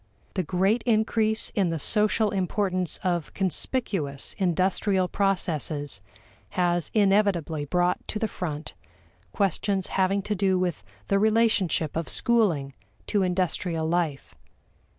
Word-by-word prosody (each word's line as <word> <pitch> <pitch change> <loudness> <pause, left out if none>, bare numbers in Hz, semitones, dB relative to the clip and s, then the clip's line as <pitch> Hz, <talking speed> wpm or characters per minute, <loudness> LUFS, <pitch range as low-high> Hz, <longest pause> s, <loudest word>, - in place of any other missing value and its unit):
The 190 - 0
great 190 +7 +1
increase 220 -1 +2
in 195 -4 +1
the 165 - -1
social 210 +5 +2
importance 185 -2 -1
of 175 -4 -1
conspicuous 190 - -1
industrial 185 +1 +1
processes 155 - -1 0.6
has 175 -2 +1
inevitably 195 -7 +2
brought 175 +4 0
to - - -3
the 220 - 0
front 155 -7 -5 0.6
questions 195 - 0
having 195 +1 +1
to 210 - -1
do 190 -1 +1
with 175 - -2 0.2
the 195 - +2
relationship 215 -7 +2
of 165 0 -2
schooling 180 - +2 0.3
to 205 - +1
industrial 180 -3 0
life. 165 -4 -1
185 Hz, 115 wpm, -26 LUFS, 170-205 Hz, 0.6 s, increase